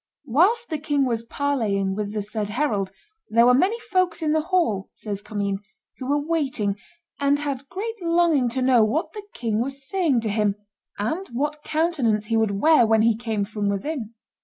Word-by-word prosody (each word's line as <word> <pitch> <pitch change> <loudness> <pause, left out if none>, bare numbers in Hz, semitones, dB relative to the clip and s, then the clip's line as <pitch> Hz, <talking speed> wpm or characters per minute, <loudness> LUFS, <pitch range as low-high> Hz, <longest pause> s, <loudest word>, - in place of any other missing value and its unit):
"Whilst 375 - +3
the 310 - -1
king 290 -2 +1
was 230 -3 0
parleying 230 -7 -1
with 205 0 -3
the 210 -1 -2
said 210 0 -3
herald, 210 -5 0 0.4
there 230 +2 +5
were 250 - +6
many 385 - +2
folks 370 -7 0
in 305 - +1
the 315 - +2
hall," 320 - 0
says 205 -2 -4
Commynes, 200 -2 -2 0.4
"who 260 0 -5
were 290 +1 0
waiting, 270 -11 0 0.4
and 285 0 +3
had 280 -2 -4
great 445 +2 -5
longing 335 -6 +3
to 255 +2 -2
know 250 -3 +5
what 245 +11 -1
the 425 - -6
king 225 -2 -1
was 270 +1 -5
saying 320 -10 +1
to 220 - -2
him, 210 -1 +1 0.4
and 315 - -2
what 295 +5 -2
countenance 300 -11 0
he 225 +1 -1
would 215 -3 +1
wear 310 0 +6
when 220 0 +4
he 230 -1 +4
came 220 -3 -2
from 210 -1 -2
within. 230 +2 -3
250 Hz, 185 wpm, -24 LUFS, 215-310 Hz, 0.4 s, were